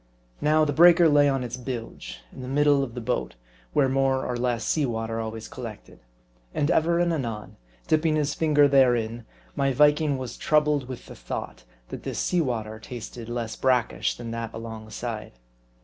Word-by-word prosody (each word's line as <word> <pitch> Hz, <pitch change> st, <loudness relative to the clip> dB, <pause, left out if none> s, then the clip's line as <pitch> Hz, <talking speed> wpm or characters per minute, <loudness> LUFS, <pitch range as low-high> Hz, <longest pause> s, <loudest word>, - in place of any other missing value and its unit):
Now 155 Hz, +1 st, +4 dB
the 145 Hz, -, -1 dB
breaker 170 Hz, +2 st, +7 dB
lay 145 Hz, -1 st, +5 dB
on 135 Hz, -2 st, 0 dB
its 120 Hz, 0 st, -5 dB
bilge, 120 Hz, -, -7 dB
in -, -, -9 dB
the 125 Hz, -, -6 dB
middle 145 Hz, +1 st, +3 dB
of 120 Hz, -3 st, -6 dB
the 125 Hz, -, -4 dB
boat, 110 Hz, -, -2 dB, 0.4 s
where 135 Hz, -, +4 dB
more 135 Hz, 0 st, +1 dB
or 125 Hz, -, -2 dB
less 120 Hz, -1 st, -1 dB
sea 155 Hz, -, +1 dB
water 115 Hz, -1 st, -3 dB
always 110 Hz, 0 st, -5 dB
collected. 115 Hz, -5 st, -9 dB, 0.6 s
And 145 Hz, +4 st, +1 dB
ever 170 Hz, +1 st, +3 dB
and 175 Hz, -1 st, +2 dB
anon, 115 Hz, -8 st, -4 dB, 0.3 s
dipping 155 Hz, 0 st, +2 dB
his 150 Hz, -1 st, 0 dB
finger 150 Hz, -2 st, +4 dB
therein, 120 Hz, -4 st, +2 dB, 0.3 s
my 135 Hz, 0 st, +1 dB
Viking 150 Hz, +1 st, +4 dB
was 130 Hz, -3 st, -6 dB
troubled 150 Hz, -3 st, +2 dB
with 130 Hz, -2 st, -8 dB
the -, -, -10 dB
thought, -, -, -6 dB, 0.2 s
that -, -, -7 dB
this -, -, -5 dB
sea 180 Hz, -1 st, +1 dB
water 110 Hz, -6 st, -3 dB
tasted 120 Hz, 0 st, -8 dB
less 120 Hz, -2 st, -3 dB
brackish 120 Hz, -6 st, +1 dB
than 115 Hz, -1 st, -6 dB
that 115 Hz, -1 st, -4 dB
alongside. 110 Hz, -, -6 dB
125 Hz, 175 wpm, -25 LUFS, 115-145 Hz, 0.6 s, breaker